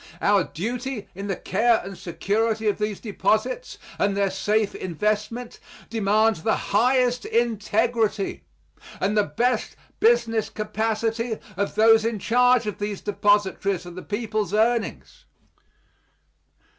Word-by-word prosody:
Our 200 -3 +3
duty 240 +4 -4
in 195 +2 -6
the 195 - -1
care 225 +6 +2
and 195 0 -7
security 220 +5 -1
of 205 - +1
these 210 -1 -2
deposits 235 - -1 0.2
and 200 -1 +1
their 200 -1 +1
safe 210 +2 0
investment 210 +7 -3 0.3
demands 215 -3 +2
the 220 - +2
highest 250 +3 +2
integrity 225 -2 0 0.6
and 200 +2 0
the 210 - +5
best 235 +10 -1 0.2
business 230 - +2
capacity 220 +1 -2 0.2
of 200 +2 -2
those 225 0 +6
in 230 -1 -1
charge 245 +2 +3
of 210 -3 -4
these 205 -1 -3
depositories 205 -2 +1
of 175 - -9
the 185 - -7
people's 210 -2 -2
earnings. 230 +1 -1
215 Hz, 120 wpm, -24 LUFS, 200-230 Hz, 0.6 s, those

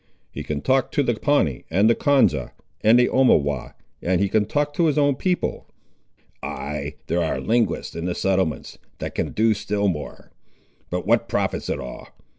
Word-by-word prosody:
He - - -6
can 75 -1 -4
talk 130 - +1
to 145 - +2
the 120 - +1
Pawnee, 110 - +1
and 100 +6 +3
the 115 - +5
Konza, 140 +2 +2 0.3
and 110 +3 +6
the 125 - +4
Omawhaw, 75 - +2 0.3
and 90 0 +1
he 100 0 +1
can 105 +1 +2
talk 145 +4 0
to 165 +2 +2
his 150 - +1
own 145 -1 +4
people." 180 +5 -2 0.7
"Ay, 75 0 -5
there - - 0
are - - -1
linguists 115 -2 0
in 85 - -4
the 90 - -2
settlements 95 -4 -1 0.2
that - - -5
can - - -2
do 110 +1 +3
still 100 0 -1
more. 75 -5 -6 0.6
But - - -3
what - - +2
profits - - -1
it - - -1
all? 65 - -8
105 Hz, 180 wpm, -23 LUFS, 85-135 Hz, 0.7 s, and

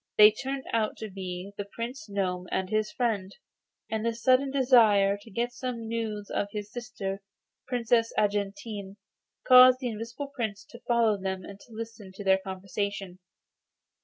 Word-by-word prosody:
They 210 0 +10
turned 270 +4 -4
out 220 -2 0
to 215 -2 -7
be 185 0 -6
the 205 - -3
Prince 230 -1 -6
Gnome 185 -2 -2
and 190 0 -1
his 215 0 +1
friend, 210 -6 -1 0.6
and 220 0 -2
the 230 0 0
sudden 255 +3 +3
desire 230 -7 +5
to 225 - -14
get 240 +3 -2
some 240 -3 -4
news 220 -3 -3
of 200 - 0
his 210 0 -6
sister, 210 -5 -5 0.5
Princess 235 -2 +2
Argentine, 200 0 -2 0.5
caused 255 0 +9
the 250 -2 -2
Invisible 230 +6 -6
Prince 215 -4 -3
to 235 - -12
follow 230 -4 +3
them 190 -1 -3
and 200 +1 -10
to 235 - -18
listen 225 -3 -8
to 205 - -8
their 190 -1 +4
conversation. 190 0 -4
215 Hz, 160 wpm, -28 LUFS, 200-235 Hz, 0.6 s, They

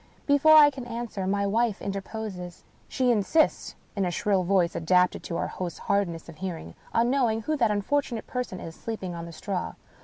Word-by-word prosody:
Before 285 +2 +6
I 295 -1 +8
can 265 -3 -8
answer, 230 -5 -4
my 200 +1 +1
wife 220 +1 +1
interposes. 195 -3 -6 0.2
She 255 -1 +1
insists 240 +9 +1 0.2
(in 200 - 0
a 180 - +1
shrill 195 +2 +1
voice, 180 -2 +2
adapted 180 +2 +2
to 170 - -3
our - - -1
host's 175 -3 -5
hardness 180 -5 -1
of 165 -2 -11
hearing) 170 - -6 0.2
on 235 +2 +2
knowing 235 -5 +1
who 310 - 0
that 230 -5 +3
unfortunate 225 +3 -1
person 250 -7 -4
is 165 - -7
sleeping 195 -3 -5
on 170 0 -6
the - - -8
straw. 180 +3 -4
200 Hz, 185 wpm, -27 LUFS, 180-240 Hz, 0.2 s, I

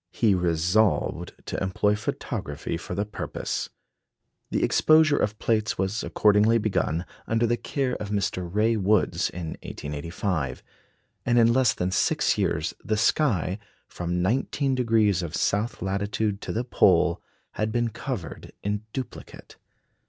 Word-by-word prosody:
He 110 -4 +2
resolved 90 +4 +1
to - - -4
employ 95 +2 +1
photography 75 -7 -4
for 90 +1 -6
the 100 +2 -1
purpose. 105 - -4 0.8
The - - 0
exposure 155 -2 +5
of 105 +1 0
plates 110 -1 0
was 95 +4 -1
accordingly 105 +2 +4
begun, 90 -6 0 0.2
under 115 +1 +2
the 120 +1 +2
care 130 +1 -2
of 105 - -6
Mr. 95 -3 -1
Ray 110 +3 +2
Woods, 105 0 +2
in 85 -2 -6
1885; 75 -1 -4 0.6
and 120 0 +2
in 115 0 +5
less 130 -2 +3
than 90 +1 -1
six - - +2
years, - - 0
the 110 0 0
sky, 110 - +1 0.3
from 90 0 -2
19° 115 - +1
of 85 -1 -4
south 105 -1 0
latitude 100 +1 -1
to - - -4
the 115 - -1
pole, 90 -7 +3 0.3
had 110 0 -2
been 120 0 +1
covered 110 - -6
in 105 0 -1
duplicate. 130 -4 -8
105 Hz, 135 wpm, -26 LUFS, 90-115 Hz, 0.8 s, exposure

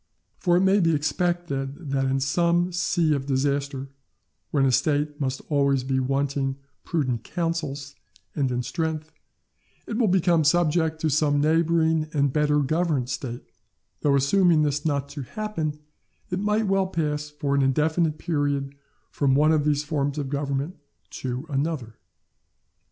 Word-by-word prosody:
For 175 -2 +3
it - - +3
may 190 +2 +4
be 165 -3 +3
expected 150 -2 -2
that 135 -1 +1
in 135 0 +1
some 170 +5 +1
sea 175 -3 +1
of 135 -1 -2
disaster, 140 0 -1 0.6
when 140 -2 +2
a 130 - +3
State 145 +3 +1
must 130 -1 -2
always 140 -3 +2
be 130 0 0
wanting 135 0 -1 0.3
prudent 130 -9 -1
counsels 155 -4 -3 0.4
and 135 -4 0
in 125 0 -1
strength, 160 +3 -3 0.7
it 220 - -3
will 230 - +3
become 175 -3 +3
subject 160 0 +2
to 160 - +1
some 145 0 +2
neighbouring 160 +1 +2
and 140 -3 +1
better 150 -1 +2
governed 145 -3 0
State; 120 -2 -5 0.6
though 140 -1 +2
assuming 155 +3 +4
this 145 0 -1
not 140 -2 -1
to 140 0 -6
happen, 160 - -4 0.5
it 180 - -1
might 210 +2 +1
well 195 -1 +2
pass 150 -4 -2
for 145 -1 -2
an 140 - +3
indefinite 155 +4 +1
period 145 -3 -1 0.4
from 135 -2 +2
one 150 +3 +4
of 155 -2 +2
these 150 -1 +1
forms 145 -1 -1
of 140 -3 -3
government 140 +3 -2 0.3
to 130 +2 -4
another. 140 -6 -3
150 Hz, 150 wpm, -25 LUFS, 140-165 Hz, 0.7 s, may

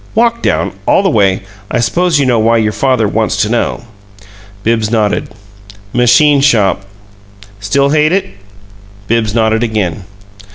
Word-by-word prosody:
Walk 235 +1 +1
down - - -1
all - - +3
the 190 - +1
way. 95 -5 +1 0.3
I 120 - -1
suppose 170 +6 +1
you 140 - +1
know 120 -3 +2
why 115 +1 +2
your 110 -1 0
father 130 -2 0
wants 110 +1 -1
to 105 - -2
know." 120 0 -2 0.8
Bibbs 110 -1 0
nodded. 110 -3 -1 0.6
"Machine 140 +4 +4
shop." 105 -8 +1 0.7
"Still 140 +8 0
hate 155 +1 +2
it?" 195 +2 +1 0.8
Bibbs 110 -2 0
nodded 110 -1 +1
again. 105 -6 -2
115 Hz, 140 wpm, -12 LUFS, 110-140 Hz, 0.8 s, Machine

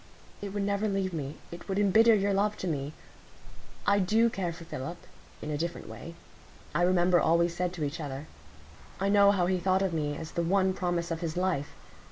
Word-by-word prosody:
It 200 -1 -5
would 205 0 -2
never 200 +1 0
leave 195 -2 -1
me; 145 -2 -4
it 175 +3 -10
would 190 - -1
embitter 220 +3 +5
your 200 0 +1
love 205 +2 +1
to 185 - -4
me. 145 -2 -2 0.9
I 200 0 +4
do 220 +5 +3
care 180 -5 -2
for 170 0 -10
Philip—in 165 0 -8
a 145 - -2
different 170 +1 -4
way; 170 0 -9 0.6
I - - +1
remember 175 0 +4
all 165 0 +3
we 170 0 +3
said 175 +1 -2
to 165 -4 -4
each 145 +3 -3
other; 140 -1 -5 0.7
I 195 +1 +1
know 200 0 +6
how 190 -3 +3
he 185 0 +1
thought 190 +2 +2
of 190 -3 0
me 145 -2 -1
as 160 - -7
the 170 - -1
one 190 +2 +2
promise 175 -2 -2
of 165 0 -3
his 165 -1 -3
life. 180 -6 -1
180 Hz, 210 wpm, -29 LUFS, 165-195 Hz, 0.9 s, know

